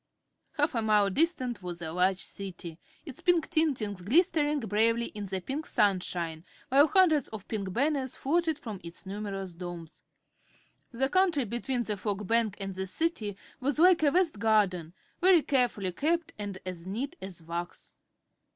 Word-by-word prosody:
Half 295 -1 +1
a 230 - 0
mile 210 -2 +3
distant 255 - 0
was 175 -1 -6
a 160 -2 -5
large 185 +2 +1
City, 180 -4 -7 0.3
its 285 -6 -9
pink 350 -3 +2
tintings 245 - 0
glistening 300 - +3
bravely 230 +2 +1
in 205 -2 -5
the 190 0 -2
pink 280 - -4
sunshine, 180 -6 0 0.3
while 280 +3 +6
hundreds 320 -7 +4
of 215 -3 -9
pink 200 -4 -3
banners 270 +3 0
floated 320 +2 0
from 215 -9 -7
its 170 +2 -9
numerous 195 -2 -5
domes. 170 -2 -8 0.9
The 260 +2 +1
country 345 -5 +2
between 240 +3 -1
the 210 -2 -3
Fog 205 +1 -3
Bank 225 -1 +1
and 195 -1 -4
the 190 +1 -4
City 215 - -1 0.2
was 275 +1 -1
like 355 +1 +6
a 300 - +5
vast 335 - +1
garden, 190 -6 +1 0.2
very 360 -3 +5
carefully 240 -8 +1
kept 325 - -1
and 200 -2 -4
as 180 -1 -6
neat 260 - -3
as 190 -3 -7
wax. 170 +2 -5
220 Hz, 160 wpm, -29 LUFS, 190-290 Hz, 0.9 s, while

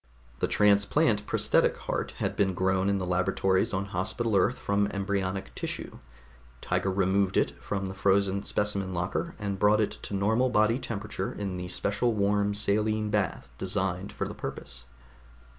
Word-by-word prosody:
The - - +1
transplant 100 -1 +3
prosthetic - - +2
heart - - -3
had - - -2
been 95 -2 +1
grown 95 +1 +1
in 100 - +2
the 95 - -2
laboratories 95 +3 +1
on 95 0 -1
Hospital 100 +5 -1
Earth 105 +7 +3
from 100 0 +1
embryonic 100 -1 -2
tissue; - - -5 0.6
Tiger 95 - -1
removed 95 0 +2
it - - +3
from 100 -1 -3
the 95 - -4
frozen 100 0 +2
specimen 100 -3 -1
locker 90 - -2
and 100 -2 -3
brought 105 +1 +4
it 105 - +1
to 100 - -5
normal 110 +6 +2
body 115 +1 +3
temperature 105 -5 -4
in 95 -3 -4
the 90 0 -5
special 105 +6 0
warm 100 0 +1
saline 105 +1 +1
bath 100 -9 -1
designed 95 0 -2
for - - -3
the - - -6
purpose. 65 -2 -7
100 Hz, 160 wpm, -28 LUFS, 95-105 Hz, 0.6 s, brought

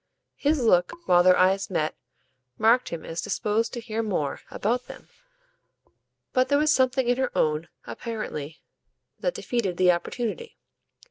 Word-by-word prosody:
His 295 +1 +1
look, 180 -6 +3
while 175 -1 +6
their 180 0 +5
eyes 190 +1 +2
met, 155 -5 -1 0.6
marked 235 +3 +3
him 170 -2 -6
as 165 +1 -4
disposed 215 +2 -1
to 240 - -4
hear 225 -1 -3
more 180 -10 -2
about 240 +4 -1
them; - - -12 1.2
but 255 -1 +2
there 285 - +4
was 305 +1 +3
something 260 -1 +2
in 245 0 +2
her 260 -1 0
own, 155 +2 +1 0.2
apparently, 165 -10 -6 0.6
that - - -1
defeated 205 -8 -2
the 180 -1 +5
opportunity. 240 - -4
220 Hz, 145 wpm, -25 LUFS, 180-250 Hz, 1.2 s, while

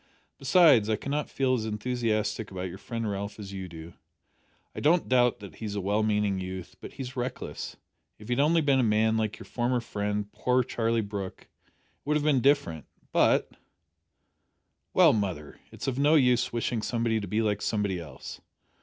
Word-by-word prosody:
Besides, 135 - +5
I 110 - +3
cannot 140 +7 -3
feel 130 -1 +1
as 120 -4 0
enthusiastic 110 -1 -1
about 95 -1 -5
your 95 +2 -9
friend 115 0 -4
Ralph 100 0 -4
as 100 -2 -8
you 95 -1 -5
do. 80 0 -10 0.8
I - - -6
don't 165 +4 +3
doubt 125 -3 +3
that 100 - -10
he 110 - -6
is 105 -1 -4
a - - -1
well 100 +3 +1
meaning 105 -2 +1
youth, 95 -1 -6
but - - -9
he 135 - -6
is 130 +1 -8
reckless. 125 0 -5 0.4
If 105 - -13
he - - -5
had 120 - -1
only 165 +3 +4
been 140 -3 +3
a - - +3
man 110 0 +3
like 110 -1 -1
your - - -11
former 125 +1 0
friend, 105 -2 -3
poor 125 0 +1
Charlie 115 -1 0
Brooke, 100 -2 -6
it - - -35 0.3
would 150 +1 +1
have 150 - -2
been 145 -4 +3
different, 135 - +1 0.2
but - - +3 0.7
" - - -50
"Well, - - +7
mother, 95 -9 -3
it's - - -7
of 135 -1 -1
no 145 +3 +5
use 125 -4 +3
wishing 120 -1 -1
somebody 115 0 0
to 100 - -5
be 110 +1 0
like 105 -2 0
somebody 105 -4 -1
else. 70 -7 -9
110 Hz, 195 wpm, -28 LUFS, 100-125 Hz, 0.8 s, Well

